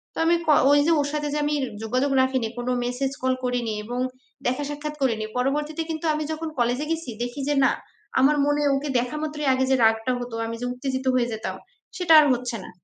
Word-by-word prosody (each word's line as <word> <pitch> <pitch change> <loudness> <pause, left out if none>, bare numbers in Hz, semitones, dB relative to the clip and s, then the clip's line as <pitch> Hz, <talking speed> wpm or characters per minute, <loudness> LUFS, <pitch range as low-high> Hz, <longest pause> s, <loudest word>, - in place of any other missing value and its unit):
তো - - -11
আমি 340 +1 +4
ক - - +1 0.2
ওই 290 - +6
যে - - +4
ওর 285 - +1
সাথে 295 -1 -1
যে - - 0
আমি 295 0 +1 0.3
যোগাযোগ 255 +5 0
রাখিনি, 260 -3 +1
কোন 245 +1 -4 0.2
message, 265 +2 -2
call 260 0 +2
করিনি 245 -3 -1
এবং 245 +2 -4 0.5
দেখা 255 +4 0
সাক্ষাৎ 300 +1 -5
করিনি। 225 -5 +1
পরবর্তীতে 295 +5 -1
কিন্তু 320 +1 -4
আমি 305 0 -2
যখন 315 0 -4
college-এ 245 +5 +1
গেছি 325 -5 -3
দেখি 245 +3 -5
যে 290 - +2
না, - - +4 0.5
আমার 285 +3 +5
মনে 290 0 +1
ওকে 280 +1 -2
দেখা 250 +5 -3
মাত্রই 300 -2 -3
আগে 260 0 +1
যে - - +5
রাগটা 225 +2 +3
হতো, 245 -2 -6
আমি 230 - -4
যে - - -2
উত্তেজিত 260 0 -3
হয়ে 240 -1 +2
যেতাম 220 - -4 0.4
সেটা 345 -3 +3
আর 300 - +6
হচ্ছে 245 -1 -3
না। - - -10
265 Hz, 215 wpm, -24 LUFS, 245-295 Hz, 0.5 s, ওই